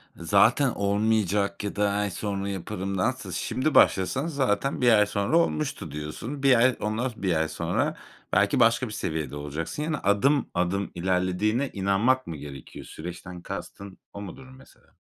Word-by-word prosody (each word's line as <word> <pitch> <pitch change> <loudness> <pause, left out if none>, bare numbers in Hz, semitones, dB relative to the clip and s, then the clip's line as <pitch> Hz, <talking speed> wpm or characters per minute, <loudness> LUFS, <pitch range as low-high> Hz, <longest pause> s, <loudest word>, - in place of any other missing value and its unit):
zaten 105 - +3
olmayacak 100 -1 0
ya 100 - -4
da 105 -1 +2
ay 105 0 -1
sonra 100 0 -3
yaparımdansa, 100 +5 -3
şimdi 135 +4 -1
başlasan 130 - +4
zaten 135 -3 0
1 120 -1 +5
ay 105 -1 +6
sonra 105 +9 +1
olmuştu 150 - -1
diyorsun. 95 - -6
1 135 -2 +6
ay, 130 0 +4
ondan 110 +4 -1
1 95 -3 -1
ay 80 0 +1
sonra - - -1 0.4
belki - - +3
başka - - +4
bir - - -7
seviyede 80 -2 -3
olacaksın. 75 - -4
Yani 155 -1 -1
adım 135 +8 +2
adım 90 +3 -1
ilerlediğine 95 +8 0
inanmak 100 +7 +1
mı 85 - -5
gerekiyor? 70 -2 -10
Süreçten 90 +2 -8
kastın 100 +1 -8 0.2
o 100 - -7
mudur 130 +7 -9
mesela? 130 +1 -19
100 Hz, 150 wpm, -26 LUFS, 90-130 Hz, 0.4 s, ay